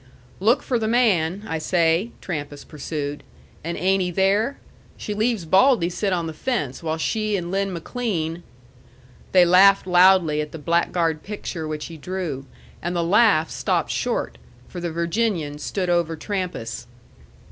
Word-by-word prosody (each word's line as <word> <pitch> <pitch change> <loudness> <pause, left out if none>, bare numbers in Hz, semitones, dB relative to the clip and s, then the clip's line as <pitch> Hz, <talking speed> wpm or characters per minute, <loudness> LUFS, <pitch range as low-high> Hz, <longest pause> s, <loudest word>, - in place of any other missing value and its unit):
"Look 225 +8 +3
for 245 -3 0
the 220 - -1
man, 205 -6 +2
I 160 -4 -2
say," 170 +5 +1
Trampas 145 -4 -5
pursued. 145 -1 -5 0.4
"And 170 +2 -4
ain't 190 +1 +2
he 180 - 0
there? 200 +8 +1 0.4
She 210 - -4
leaves 215 -3 0
Baldy 190 - +4
sit 195 +2 -1
on 175 -2 0
the 160 - -5
fence 155 - -3
while 160 -1 -2
she 215 +4 -1
and 175 -1 -5
Lin 195 0 0
McLean 170 -3 -3 0.5
" 125 +1 -26
They 180 -2 +6
laughed 195 +3 +6
loudly 180 -4 +5
at 150 - -6
the - - -5
blackguard 165 0 0
picture 190 -6 -5
which 155 -1 -4
he 165 - -9
drew; 160 -5 -5 0.3
and 175 +2 -3
the 170 - +1
laugh 195 -3 +4
stopped - - -1
short, - - -2 0.3
for 180 - -8
the 175 -1 -3
Virginian 170 -3 -1
stood 185 +5 -3
over 170 -2 +1
Trampas. 155 - -4
175 Hz, 160 wpm, -23 LUFS, 160-195 Hz, 0.5 s, They